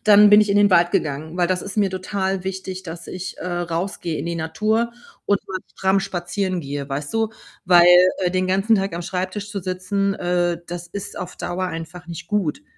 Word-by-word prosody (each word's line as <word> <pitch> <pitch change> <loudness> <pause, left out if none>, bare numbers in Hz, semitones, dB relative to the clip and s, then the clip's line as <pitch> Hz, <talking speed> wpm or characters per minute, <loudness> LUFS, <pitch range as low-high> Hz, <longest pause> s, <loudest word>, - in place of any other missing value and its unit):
dann 210 0 +8
bin 210 +1 +9
ich 210 - +2
in 200 - +3
den 205 -1 +5
Wald 175 -1 +5
gegangen, 155 +3 -2
weil 175 -1 +2
das 185 0 0
ist 200 +2 -7
mir 200 -2 +2
total 190 0 -2
wichtig, 190 0 -5
dass 165 0 -8
ich, 185 0 -6
äh, - - -6
rausgehe 175 -1 -2
in - - -4
die 170 - -2
Natur 215 +8 0 0.3
und 200 -1 +1
mal 190 -1 -3 0.2
stramm 190 +1 +2
spazieren 185 0 -2
gehe, 140 -1 -5
weißt 140 +5 -4
du? 225 -1 +1 0.4
Weil, 175 -1 +7 0.4
äh, 180 -1 +1
den 185 0 0
ganzen 195 +4 +3
Tag 195 -3 -1
am 170 - -4
Schreibtisch 190 +3 -3
zu 200 -1 -4
sitzen, 190 +2 -1
äh, 175 -2 0
das 175 0 -6
ist 195 +3 -7
auf 180 - -6
Dauer 185 +1 -3
einfach 165 0 -7
nicht 170 -1 -8
gut. 210 - -1
185 Hz, 205 wpm, -22 LUFS, 175-200 Hz, 0.4 s, bin